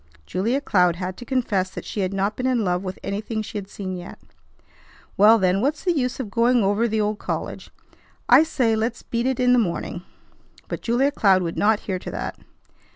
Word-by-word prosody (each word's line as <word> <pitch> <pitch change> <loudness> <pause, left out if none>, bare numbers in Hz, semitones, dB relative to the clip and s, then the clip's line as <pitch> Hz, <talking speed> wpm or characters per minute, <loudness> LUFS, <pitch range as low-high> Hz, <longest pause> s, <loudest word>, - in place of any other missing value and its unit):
Julia 230 - -1
Cloud 180 -9 +3
had 185 +1 -4
to 245 - -9
confess 220 -8 0
that - - -8
she - - -5
had 185 -1 0
not 195 +2 -1
been 255 - -2
in 250 -3 +1
love 180 0 0
with 190 -1 -5
anything 215 +2 -3
she 215 0 -5
had 195 -1 -10
seen 190 -3 -5
yet. 175 0 -9 1.0
"Well, 215 +3 +7
then, 190 -1 +2
what's 290 +5 -1
the 355 -2 +1
use 250 -3 -1
of 225 -6 -5
going 235 +1 +3
over 205 +4 +2
the 220 -1 -1
old 210 0 -1
college? - - -5 0.6
I 250 +4 +8
say 255 -8 +1
let's 225 +2 -2
beat 235 +1 -2
it 265 0 -1
in 250 0 +4
the 250 - +5
morning." 180 -3 -2 0.7
But - - -5
Julia 250 +5 +2
Cloud 190 -8 +3
would 170 -1 -3
not 210 +1 +2
hear 185 -2 -3
to - - -7
that. - - -5
215 Hz, 210 wpm, -23 LUFS, 190-245 Hz, 1.0 s, I